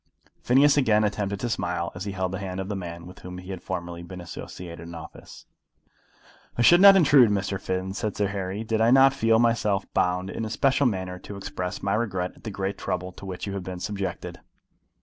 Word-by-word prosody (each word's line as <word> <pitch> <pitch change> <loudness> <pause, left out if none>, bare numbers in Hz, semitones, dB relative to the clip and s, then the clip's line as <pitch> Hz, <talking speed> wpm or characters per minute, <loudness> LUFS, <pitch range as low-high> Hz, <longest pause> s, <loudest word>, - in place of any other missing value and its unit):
Phineas 140 +4 +4
again 110 -6 +3
attempted 100 -1 -1
to 120 - -1
smile 90 -5 -2
as 95 +2 -6
he 100 - -4
held 95 -1 -2
the 95 - -4
hand 95 -1 -5
of 95 +1 -4
the 105 - -2
man 85 -3 -7
with 90 - -12
whom 90 0 -8
he 90 +1 -8
had 95 - -6
formerly 85 -2 -5
been 90 +1 -9
associated 85 0 -8
in 85 - -9
office. 80 - -11 1.1
"I 120 - +2
should 175 +7 +7
not 200 0 +10
intrude, 140 - +6
Mr. 100 -1 -1
Finn," 95 +1 -3
said 105 0 -3
Sir 100 -1 +1
Harry, 100 +1 -4
"did 110 0 -1
I 115 - +5
not 135 +1 +6
feel 115 -4 +3
myself 110 -4 +2
bound 90 +1 0
in - - -4
a 110 - -3
special 135 +3 +2
manner 95 -4 -3
to 100 +2 -9
express 90 -2 -5
my 100 0 0
regret 95 -5 -1
at - - -20
the - - -3
great 100 0 -4
trouble 90 +1 -3
to 95 - -11
which 90 -1 -5
you 100 - -4
have 100 - -3
been 90 -1 -6
subjected." 100 0 -4
95 Hz, 220 wpm, -25 LUFS, 90-110 Hz, 1.1 s, not